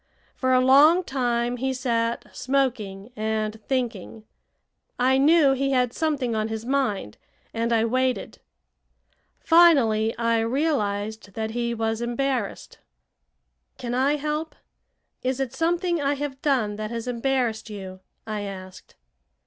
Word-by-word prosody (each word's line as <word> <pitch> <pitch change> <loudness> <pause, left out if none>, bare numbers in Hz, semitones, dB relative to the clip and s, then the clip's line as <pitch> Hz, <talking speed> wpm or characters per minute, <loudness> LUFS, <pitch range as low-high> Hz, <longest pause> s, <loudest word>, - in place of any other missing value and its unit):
For 260 -1 -1
a 255 - +5
long 300 +7 +6
time 245 -4 -1
he 265 +1 -1
sat 235 -2 -1
smoking 245 -6 -1
and 215 0 -2
thinking. 230 -5 -3 0.7
I 260 +2 +3
knew 300 0 +5
he 275 +1 0
had 250 -2 +1
something 285 -7 -1
on 215 0 0
his 220 0 -5
mind, 245 - -1 0.3
and 230 +1 -1
I 225 -1 +3
waited. 255 +2 -1 1.0
Finally 260 -11 +4
I 230 -1 +1
realized 220 -6 -1
that 220 0 -3
he 235 0 -2
was 225 0 -1
embarrassed. 240 -1 -2 1.0
"Can 240 -1 -4
I 270 +4 +2
help? 300 +2 -3 0.7
Is 260 +1 -1
it 265 -3 -2
something 345 0 0
I 285 +1 +1
have 280 -1 -5
done 235 -8 +1
that 215 0 -4
has 230 +1 -5
embarrassed 245 -2 -1
you?" 190 -3 -8 0.3
I 215 -2 -4
asked. 185 -2 -9
240 Hz, 130 wpm, -24 LUFS, 220-275 Hz, 1.0 s, long